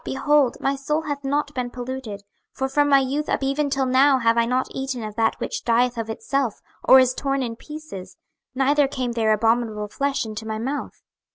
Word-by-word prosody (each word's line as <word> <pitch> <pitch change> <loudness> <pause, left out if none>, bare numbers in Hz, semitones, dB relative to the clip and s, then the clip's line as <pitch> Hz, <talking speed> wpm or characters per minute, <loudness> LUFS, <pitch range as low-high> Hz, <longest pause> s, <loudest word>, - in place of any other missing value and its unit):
behold, 280 -1 +2
my 275 +1 0
soul 300 +3 -2
hath 290 -2 -4
not 285 +1 -1
been 250 -2 -3
polluted: 245 -4 -6 0.3
for 265 - -2
from 290 +2 +2
my 280 - +7
youth 275 +3 -1
up - - 0
even 280 +2 0
till 270 -1 0
now 265 +2 +4
have 230 -2 +2
I 230 0 +2
not 255 +1 0
eaten 265 -3 -4
of 215 -1 -6
that 225 0 0
which - - -4
dieth 245 +1 +2
of 225 -1 -4
itself, 245 +1 -2 0.2
or 265 - +8
is 255 -1 +3
torn 275 0 -1
in 230 -2 -4
pieces; 300 -11 -10 0.4
neither 280 +2 +3
came 260 -3 -3
there 225 -2 +1
abominable 220 -1 +1
flesh 275 +3 -1
into 215 0 -6
my 220 0 -3
mouth. 265 +6 -5
260 Hz, 200 wpm, -23 LUFS, 230-275 Hz, 0.4 s, or